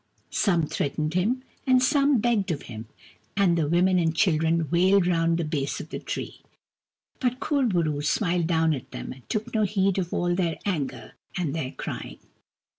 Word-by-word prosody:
Some 175 -6 +2
threatened 150 +2 -2
him, 225 +9 0 0.2
and 255 -1 +6
some 280 +1 +3
begged 220 -4 +1
of 155 -4 -2
him, 110 -1 -8 0.5
and 190 -4 +4
the 160 -3 +1
women 180 +3 +3
and 165 -1 +1
children 165 -3 +2
wailed 185 +2 +4
round 165 -1 +2
the 170 - -1
base 145 -2 -2
of - - -8
the - - -5
tree. - - -6 0.8
But 250 -1 0
Kur 280 -4 +1
bo 175 -6 +2
roo 150 -2 -1
smiled 170 +2 +1
down 160 -2 +2
at 135 - -6
them, - - -6
and 130 -2 -13
took 215 0 -2
no 220 - +2
heed 195 -2 +1
of 175 -2 -3
all 175 0 0
their 175 -2 0
anger 160 -9 -3 0.2
and 165 -6 -1
their 155 -5 -3
crying. - - -6
175 Hz, 185 wpm, -26 LUFS, 160-200 Hz, 0.8 s, and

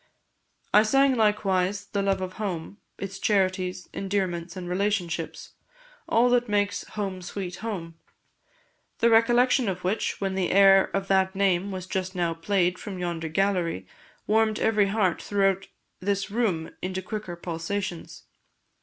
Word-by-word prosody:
I 210 - +8
sang, 270 +5 +4
likewise, 200 -3 +1
the 200 0 -2
love 195 -1 0
of 185 0 -4
home 185 -1 -4 0.2
its 195 0 -6
charities, 185 -3 0
endearments 185 -3 -2
and 180 -1 -6
relationships 180 -3 -2 0.6
all 235 +2 +4
that 245 -2 +2
makes 205 -1 0
'Home 195 -3 -3
sweet 180 0 -5
Home,' 170 -7 -6 1.0
the 235 0 +3
recollection 240 +1 +4
of 185 -1 -4
which, 190 +4 -1
when 195 -1 -1
the 190 -2 0
air 195 0 +6
of 195 0 -1
that 190 0 +2
name 195 -1 +2
was 185 -2 -5
just 185 0 -3
now 170 -2 0
played 180 +1 0
from 195 -3 -6
yonder 170 -2 -3
gallery, 175 - 0 0.4
warmed 220 0 +2
every 215 -2 +3
heart 195 -4 +1
throughout 195 -1 +1 0.3
this 200 +1 -1
room 200 -8 0
into 185 +1 -3
quicker 210 -3 -5
pulsations. 170 +2 -5
195 Hz, 140 wpm, -26 LUFS, 180-205 Hz, 1.0 s, I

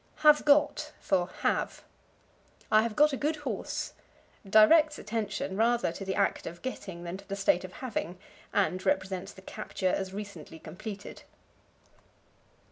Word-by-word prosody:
Have 300 0 +7
Got 300 +1 +3
for 180 -2 +1 0.2
Have. - - 0 0.9
"I 215 - +7
have 225 -1 -2
got 300 0 +5
a - - -1
good 300 +4 0
horse" 295 - -4 0.6
directs 300 +9 +6
attention 210 -3 -3
rather 235 -2 +2
to 195 - -7
the 190 0 -2
act 200 -1 0
of 170 - -8
getting 195 -9 -6
than 175 +2 -5
to - - -15
the 195 - -2
state 195 -2 +2
of 185 0 -8
having, 185 -7 -3 0.3
and 185 -2 +1
represents 190 -1 -1
the 190 - -15
capture 190 -2 -3
as 190 -1 -2
recently 195 -6 -8
completed. 195 +6 -8
200 Hz, 145 wpm, -29 LUFS, 190-240 Hz, 0.9 s, Have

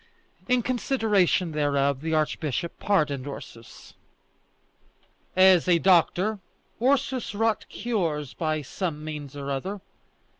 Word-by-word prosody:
In 250 -1 +2
consideration 215 -8 +1
thereof 140 -2 +1
the 160 +1 -3
archbishop 155 +1 -2
pardoned 150 -9 0
Ursus. 120 -4 -10 1.4
As 185 -2 +6
a 175 -1 +5
doctor, 190 +4 +3 0.4
Ursus 260 -3 +1
wrought 220 0 0
cures 165 - -2
by 155 -2 -2
some 155 +1 -4
means 150 -2 -7
or 140 0 -4
other. 190 +9 -3
170 Hz, 105 wpm, -26 LUFS, 150-205 Hz, 1.4 s, As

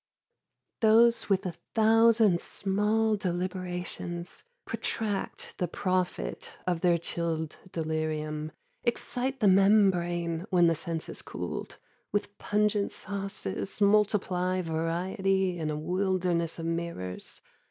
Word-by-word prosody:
These 230 +1 +5
with 195 0 +2
a 180 - -1 0.2
thousand 225 -4 +5
small 210 +3 +1
deliberations 180 - -4 0.2
Protract 210 -3 -3
the 180 - +1
profit 180 - -2
of 175 -2 0
their 175 -1 +4
chilled 165 -2 -3
delirium, 155 -1 -2 0.3
Excite 250 +2 -1
the 210 - +5
membrane, 185 -3 +3
when 180 -3 +5
the 165 - +5
sense 165 0 -3
has - - -5
cooled, - - -6 0.3
With 205 0 -2
pungent 210 -1 +1
sauces, 195 - -4
multiply 195 -3 +2
variety 180 +3 0
In 155 -1 -1
a 150 - -2
wilderness 180 0 0
of 165 - -5
mirrors. 165 - -4
185 Hz, 105 wpm, -29 LUFS, 170-205 Hz, 0.3 s, These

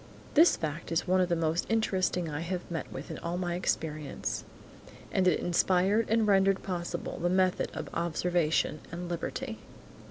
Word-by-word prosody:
This 325 +3 +6
fact 155 +1 -4
is 165 +3 0
one 185 +1 +4
of 180 - +1
the 170 - +2
most 165 +1 0
interesting 190 -5 +1
I 150 -1 -3
have 175 +1 -4
met 165 -4 -4
with 135 +3 -7
in - - -6
all 170 +1 -3
my 175 -1 -1
experience, 155 -4 -2 0.7
and 185 -1 +2
it 175 - +4
inspired 185 +5 +2
and 225 0 +3
rendered 195 -1 +3
possible 175 -3 -4
the 175 - +1
method 185 0 +2
of - - -4
observation 170 -2 +1
and 175 +1 -5
liberty. 170 -1 -4
175 Hz, 165 wpm, -30 LUFS, 165-185 Hz, 0.7 s, This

